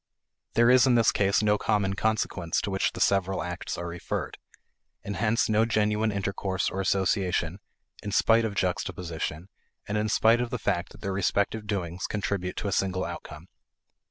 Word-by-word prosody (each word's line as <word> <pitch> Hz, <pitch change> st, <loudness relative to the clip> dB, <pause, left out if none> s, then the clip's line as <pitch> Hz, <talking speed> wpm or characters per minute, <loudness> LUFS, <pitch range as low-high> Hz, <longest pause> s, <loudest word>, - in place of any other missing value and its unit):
There 115 Hz, +1 st, +5 dB
is, 130 Hz, +1 st, +6 dB
in 125 Hz, -, +4 dB
this 115 Hz, -1 st, +4 dB
case, 100 Hz, +1 st, +2 dB
no 105 Hz, -1 st, +3 dB
common 105 Hz, -3 st, +1 dB
consequence 100 Hz, -5 st, -1 dB
to 100 Hz, -, -3 dB
which 95 Hz, -, 0 dB
the -, -, -7 dB
several 95 Hz, -1 st, +1 dB
acts 90 Hz, 0 st, -5 dB
are 85 Hz, -, -4 dB
referred, 85 Hz, 0 st, -4 dB, 0.6 s
and 100 Hz, -, -4 dB
hence 115 Hz, 0 st, +2 dB
no 110 Hz, 0 st, +3 dB
genuine 110 Hz, -1 st, +1 dB
intercourse 100 Hz, -1 st, -2 dB
or 95 Hz, -, -2 dB
association, 95 Hz, -2 st, 0 dB, 0.4 s
in 105 Hz, -, -5 dB
spite 115 Hz, +3 st, +4 dB
of 110 Hz, -3 st, -2 dB
juxtaposition, 90 Hz, -3 st, -3 dB, 0.4 s
and 105 Hz, +1 st, -1 dB
in 110 Hz, 0 st, -1 dB
spite 115 Hz, +3 st, +4 dB
of 120 Hz, -, -2 dB
the 125 Hz, -, -2 dB
fact 90 Hz, -4 st, -1 dB
that -, -, -15 dB
their 100 Hz, -2 st, -2 dB
respective 100 Hz, +3 st, 0 dB
doings 90 Hz, -3 st, -3 dB
contribute 100 Hz, -3 st, -2 dB
to -, -, -3 dB
a -, -, -1 dB
single 95 Hz, -1 st, 0 dB
outcome. 75 Hz, +2 st, -8 dB
100 Hz, 175 wpm, -27 LUFS, 95-110 Hz, 0.6 s, is